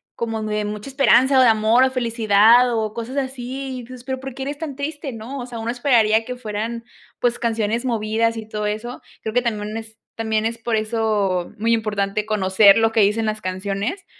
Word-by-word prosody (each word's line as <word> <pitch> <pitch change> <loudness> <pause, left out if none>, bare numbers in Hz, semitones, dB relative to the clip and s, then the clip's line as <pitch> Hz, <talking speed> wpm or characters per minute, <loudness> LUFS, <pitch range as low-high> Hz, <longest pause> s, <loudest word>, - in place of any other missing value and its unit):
como 225 -1 -3
muy 215 0 -2
de 210 - -1
mucha 210 +3 -5
esperanza, 270 -1 +4
o, - - +7
de 250 - +6
amor, 220 +3 +4
o, 265 - +2
felicidad 235 0 +4
o 220 -1 -1
cosas 240 +4 -6
así, 260 0 -4
y - - -8
tu - - -14
dices: 250 0 -12
"Pero 260 -1 -3
¿por 270 -1 -6
qué 265 - -6
eres 285 +2 -5
tan 305 -4 -5
triste, 290 -1 -4
no?", 230 +5 -7
o 245 - -5
sea, 240 -2 -8
uno 230 +1 -2
esperaría 230 -4 +3
que 250 +2 -6
fueran, 230 +1 -4 0.3
pues, 240 0 +1
canciones 225 0 -1
movidas 230 -1 0
y 220 -1 -7
todo 210 -1 -4
eso. 220 +4 -5 0.2
Creo 220 - -4
que 245 - +3
también 215 -3 -3
es 220 0 -8 0.2
también 220 -1 -1
es 230 +1 -2
por 230 0 -1
eso 215 -5 0
muy 230 +2 +1
importante 210 -2 -1
conocer 200 -1 +5
lo 225 0 +3
que 225 - +1
dicen 210 +3 +2
las 215 0 -2
canciones, 200 - -3
225 Hz, 215 wpm, -21 LUFS, 215-250 Hz, 0.3 s, o